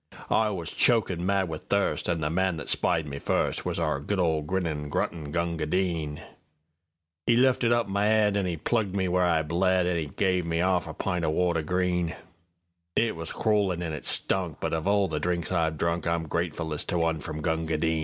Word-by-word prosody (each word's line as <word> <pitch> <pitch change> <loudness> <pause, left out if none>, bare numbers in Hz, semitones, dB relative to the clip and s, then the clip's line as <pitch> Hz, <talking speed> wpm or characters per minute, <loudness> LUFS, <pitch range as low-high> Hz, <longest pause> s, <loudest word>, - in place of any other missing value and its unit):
I 110 -1 +3
was 90 -5 -4
chokin' 100 -8 +2
mad 95 0 +1
with 80 -2 -7
thirst, 100 -2 0
An' 85 -2 0
the 75 0 -1
man 95 0 +1
that 75 - -7
spied 80 - +1
me 70 -1 -6
firstWas - - -1
our 70 - 0
good 100 +8 -2
old 80 -4 +1
grinnin', 80 -5 -2
gruntin' 75 0 -2
Gunga 85 -1 -1
Din.'E 80 +1 -4
lifted 125 -2 +3
up 120 -1 +2
my 100 +1 +1
'ead, 105 -2 +3
An' 100 -2 0
'e 85 -2 -2
plugged 100 +4 -1
me 95 -2 +1
where 90 +1 +1
I 85 -3 +3
bled, 90 +3 +2
An' 90 -1 0
'e 80 -2 -2
guv 90 +3 0
me 85 0 -1
'arf 90 -1 +1
a 80 - -7
pint 90 -3 -2
o' 80 - +1
water—green; 90 +1 0 0.8
It 115 -1 +2
was 80 0 -5
crawlin' 100 -5 +1
an' 80 -2 -3
it 75 - -6
stunk, 90 -5 +2
But - - -2
of 80 +3 -1
all 100 -1 +3
the 75 -3 -2
drinks 85 0 -1
I've 80 -3 +1
drunk, 85 +2 -1
I'm 85 -1 0
gratefullest 80 -1 -2
to 90 - 0
one 80 -1 +1
from 75 +1 -6
Gunga 80 -1 0
Din. 80 +1 +1
85 Hz, 200 wpm, -27 LUFS, 80-95 Hz, 0.8 s, I